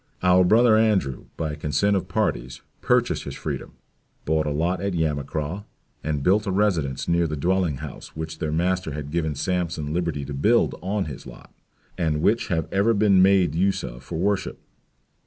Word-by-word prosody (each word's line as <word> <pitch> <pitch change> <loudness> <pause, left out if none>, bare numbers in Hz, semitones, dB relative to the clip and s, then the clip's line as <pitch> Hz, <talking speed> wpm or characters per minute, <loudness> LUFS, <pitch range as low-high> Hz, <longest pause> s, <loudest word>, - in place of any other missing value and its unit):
Our 90 0 +5
Brother 110 +4 +5
Andrew, 100 - +1
by 80 -2 -2
consent 75 +7 +1
of 95 - -1
parties, 65 +2 -2 0.2
purchased - - +2
his - - -6
freedom, - - -5 0.5
bought 80 0 +1
a - - +1
lot 85 +5 -1
at 100 -2 -2
Yamacraw, 75 +3 -2 0.4
and 75 -2 -2
built 100 +5 +3
a - - 0
residence 90 -10 0
near 85 0 +2
the 75 - -3
dwelling 90 -1 +1
house - - -10
which 80 0 -6
their 80 - -2
master 90 0 0
had 75 -1 -6
given 80 -2 -1
Sampson 80 -1 -2
liberty 85 -5 -2
to 70 - -6
build 110 +13 +2
on 100 +2 -1
his 70 -4 -8
lot; - - -13 0.5
and 80 -2 0
which 115 +3 +2
have 80 -3 -1
ever 105 +4 +3
been 100 -2 +4
made 95 -4 +4
use 95 +4 +1
of - - -7
for 70 - -6
worship. 95 +3 -1
85 Hz, 175 wpm, -24 LUFS, 75-95 Hz, 0.5 s, Our